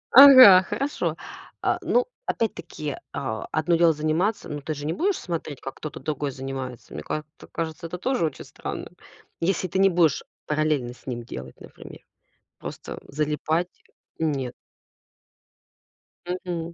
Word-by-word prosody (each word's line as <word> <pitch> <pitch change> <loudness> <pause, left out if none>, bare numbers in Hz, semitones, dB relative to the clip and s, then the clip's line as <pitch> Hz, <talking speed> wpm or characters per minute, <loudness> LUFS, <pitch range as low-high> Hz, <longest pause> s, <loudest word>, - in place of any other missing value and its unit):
Ага, 255 -9 +11
хорошо. 280 +2 -1 0.4
А, - - +1
ну, - - +2 0.2
опять-таки, 155 -9 -3 0.2
а, 110 -5 -3
одно 155 +2 +2
дело 165 -1 +5
заниматься. 155 +8 0
Но 145 0 -5
ты 155 +2 -3
же 145 0 -6
не 160 - 0
будешь 385 +3 +1
смотреть, 160 -6 -5
как 135 - -7
кто-то 155 - -7
другой 150 -2 -2
занимается. 130 -2 -6
Мне 75 - -5
ка 155 - -3 0.2
ц - - -13
кажется, 165 +1 -4
это 180 - -5
тоже 255 +3 0
очень 155 - -5
странным. - - -7 0.5
Если 185 +1 +1
ты 190 - -2
не 195 0 +6
будешь 170 -5 +3 0.2
параллельно 150 -5 0
с - - -22
ним 120 -2 -4
делать, 65 - -9
например. - - -12 0.6
Просто - - -7
залипать? 155 +4 0 0.5
Нет. 140 -6 -1 1.7
Мгм. 175 -2 -4
155 Hz, 145 wpm, -25 LUFS, 140-180 Hz, 1.7 s, Ага